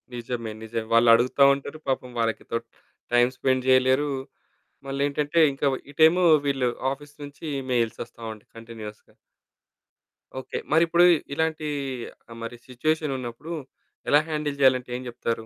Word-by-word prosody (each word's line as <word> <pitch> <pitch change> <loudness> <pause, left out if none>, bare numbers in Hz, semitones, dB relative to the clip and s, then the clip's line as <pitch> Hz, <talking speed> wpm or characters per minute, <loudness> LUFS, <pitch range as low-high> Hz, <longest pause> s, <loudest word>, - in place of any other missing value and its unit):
నిజమే. 115 -2 -4
నిజమే. 110 0 -4
వాళ్ళు 115 0 +6
అడుగుతా 125 +4 +3
ఉంటారు. 140 +2 -6
పాపం 130 -1 -2
వాళ్ళకి 115 -1 -1
తోటి 115 0 -2 0.5
టైమ్ 120 +1 +4
స్పెండ్ 130 -1 0
జేయలేరు. 130 +3 +4 0.8
మళ్ళేంటంటే 145 +3 -1
ఇంకవు 135 -1 0
ఇటేమో 160 +4 +5 0.2
వీళ్ళు 135 -3 +1 0.2
ఆఫీస్ 145 +1 -11
నుంచి 145 +3 -10 0.3
మెయిల్స్ 115 -2 0
వస్తా 115 - -18
ఉంటయి 105 - -15
కంటిన్యూయస్‌గా. 110 -2 -10 1.3
ఓకే. - - -6
మరి 160 +2 +5
ఇప్పుడు 170 +1 +4 0.3
ఇలాంటి 160 0 -1 0.6
ఆహ్, 115 - -9
మరి 120 +1 -6
సిచ్యువేషన్ 150 +3 -1
ఉన్నప్పుడు, 125 +6 -7 0.6
ఎలా 145 - +6
హ్యాండిల్ 150 -2 -2
జేయాలంటే 130 -2 +4
ఏం 130 - -8
చెప్తారు? 115 -1 -3
130 Hz, 130 wpm, -25 LUFS, 115-145 Hz, 1.3 s, వాళ్ళు